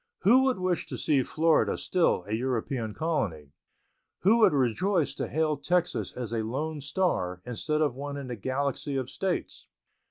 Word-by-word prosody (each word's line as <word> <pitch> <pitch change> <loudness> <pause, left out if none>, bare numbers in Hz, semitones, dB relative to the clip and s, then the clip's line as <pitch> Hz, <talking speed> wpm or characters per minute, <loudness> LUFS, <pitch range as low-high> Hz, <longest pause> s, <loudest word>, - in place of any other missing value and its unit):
Who 250 +7 +5
would 260 -2 +2
wish 185 -1 -1
to - - -5
see 140 -3 +2
Florida 160 +4 +2
still 170 - +1
a 105 - -3
European 120 -1 -2
colony? 100 - -2 0.7
Who 215 +5 +5
would 220 - +6
rejoice 150 - +1
to - - -3
hail 155 -1 0
Texas 180 0 0
as 120 -3 -5
a 115 - 0
lone 145 +7 -3
star 140 - -1
instead 150 +6 -2
of 145 -5 +2
one 140 +2 -5
in 140 - -5
the 125 -1 -5
galaxy 135 +5 -2
of 130 -2 -2
States? 190 -2 -3
145 Hz, 165 wpm, -28 LUFS, 120-170 Hz, 0.7 s, would